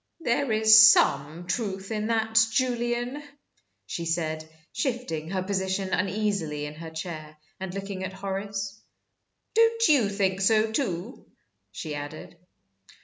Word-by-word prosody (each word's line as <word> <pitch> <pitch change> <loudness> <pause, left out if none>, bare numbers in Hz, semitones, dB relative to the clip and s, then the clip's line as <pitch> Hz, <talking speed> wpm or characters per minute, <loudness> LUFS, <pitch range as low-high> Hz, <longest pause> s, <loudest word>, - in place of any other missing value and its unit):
"There 265 -2 0
is 220 +1 +8
some 155 +5 +1
truth 195 -1 -3
in 215 -1 -2
that, 220 -1 +2
Julian," 240 +2 -1 0.6
she 170 - -5
said, 160 -1 -2 0.2
shifting 200 - -3
her 190 0 -2
position 190 0 -2
uneasily 185 -5 -1
in 150 - -6
her 160 +1 -8
chair, 160 -2 -7 0.2
and 190 -1 -5
looking 195 0 -5
at 185 0 -5
Horace. 195 +1 -5 0.7
"Don't 455 0 +4
you 255 -9 +4
think 195 -2 0
so, 220 +2 +3
too?" 220 -2 -3 0.4
she 155 -2 -6
added. 145 +3 -7
195 Hz, 125 wpm, -26 LUFS, 170-220 Hz, 0.7 s, is